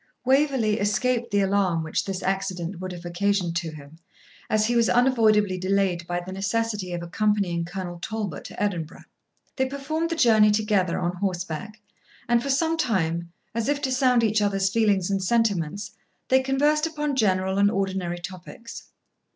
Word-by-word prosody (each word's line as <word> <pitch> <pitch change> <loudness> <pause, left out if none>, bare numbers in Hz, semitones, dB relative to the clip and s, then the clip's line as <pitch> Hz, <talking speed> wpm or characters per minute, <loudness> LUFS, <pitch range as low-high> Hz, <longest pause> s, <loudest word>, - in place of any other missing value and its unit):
Waverley 265 -5 +2
escaped 235 +4 0
the 205 0 +2
alarm 190 -4 +1
which 160 - -2
this 195 -1 -4
accident 190 -2 -2
would 185 0 -5
have 175 -1 -9
occasioned 180 0 0
to 170 -2 -3
him, 155 +1 -12 0.5
as 215 0 +2
he 240 +2 0
was 230 -1 +3
unavoidably 215 -6 +3
delayed 185 -2 0
by 175 0 -1
the 180 +1 -8
necessity 200 0 -2
of 175 -1 -4
accompanying 185 -2 0
Colonel 175 -1 -6
Talbot 210 -3 -4
to - - -9
Edinburgh. 180 -6 -3 0.5
They 265 -1 +1
performed 305 +5 -3
the 330 - -1
journey 220 -7 +5
together 210 -4 +1
on 175 0 -2
horseback, 185 +2 -4 0.5
and 240 -1 +3
for 275 - -4
some 320 +4 +1
time, 170 - 0 0.2
as 230 +3 -1
if 290 0 +1
to 265 - 0
sound 255 -2 +3
each 215 -1 +2
other's 195 -1 +1
feelings 200 -4 +2
and 195 -1 0
sentiments, 200 -3 0 0.4
they 260 0 +5
conversed 295 +4 +2
upon 300 -3 -2
general 190 -4 +1
and 200 0 +5
ordinary 190 -3 -2
topics. 185 +6 -9
200 Hz, 165 wpm, -25 LUFS, 180-235 Hz, 0.5 s, journey